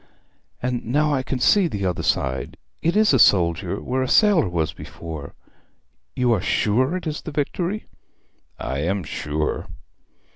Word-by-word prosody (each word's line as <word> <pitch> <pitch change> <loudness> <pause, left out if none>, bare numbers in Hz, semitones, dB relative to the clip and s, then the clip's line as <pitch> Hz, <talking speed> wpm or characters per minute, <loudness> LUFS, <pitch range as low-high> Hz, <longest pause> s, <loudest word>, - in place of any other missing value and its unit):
'And 125 -1 -1
now 150 +5 +1
I 135 - +1
can 130 +1 -3
see 190 +8 +4
the 100 -10 -3
other 90 -2 -1
side; 65 -2 -1 0.2
it 170 +3 +1
is 215 -6 +4
a 130 - +4
soldier 90 -1 +3
where 130 +1 -2
a 130 - 0
sailor 200 - +4
was 80 -3 -1
before. 80 -4 -8 0.8
You 125 -2 +2
are 105 - 0
sure 130 - +1
it 180 - -8
is 155 -1 -3
the - - -7
Victory?' 175 +8 -2 0.7
'I 65 - -3
am 90 +5 -1
sure.' 75 +1 -3
120 Hz, 155 wpm, -23 LUFS, -, 0.8 s, see